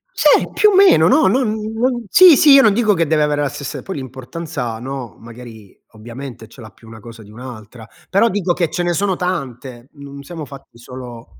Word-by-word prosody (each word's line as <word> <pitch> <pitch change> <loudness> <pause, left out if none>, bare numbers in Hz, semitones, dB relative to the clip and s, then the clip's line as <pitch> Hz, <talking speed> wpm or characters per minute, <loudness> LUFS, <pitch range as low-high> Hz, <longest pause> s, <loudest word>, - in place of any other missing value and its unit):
Sì, - - +3
più 425 - +3
o 405 - 0
meno. 370 - +5
No, 300 +10 +3
no, 260 - +2
mhmm, 220 0 -4
non 245 -2 -1
sì, 360 - +7
sì, 295 - +5
io 275 - +8
non 215 -5 +4
dico 215 -3 +2
che 165 -3 -1
deve 155 -1 +1
avere 145 0 -1
la 145 - -1
stessa 140 - -7
poi 190 - -7
l'importanza, 130 -1 -7
no, 130 -1 -8
magari 115 -3 -14 0.2
ovviamente 120 +2 -10
ce 130 - -16
l'ha 110 - -11
più 110 +3 -21
una 110 0 -12
cosa 115 0 -13
di 105 - -17
un'altra. 115 -1 -12 0.2
Però 225 +5 +3
dico 185 -3 -1
che 170 -3 -2
ce 175 - -3
ne 175 0 -1
sono 190 +1 -1
tante, 130 -8 -6
mhmm, 140 -1 -14
non 140 - -10
siamo 160 0 -8
fatti 135 -3 -15
solo 120 - -12
140 Hz, 220 wpm, -17 LUFS, 120-190 Hz, 0.2 s, io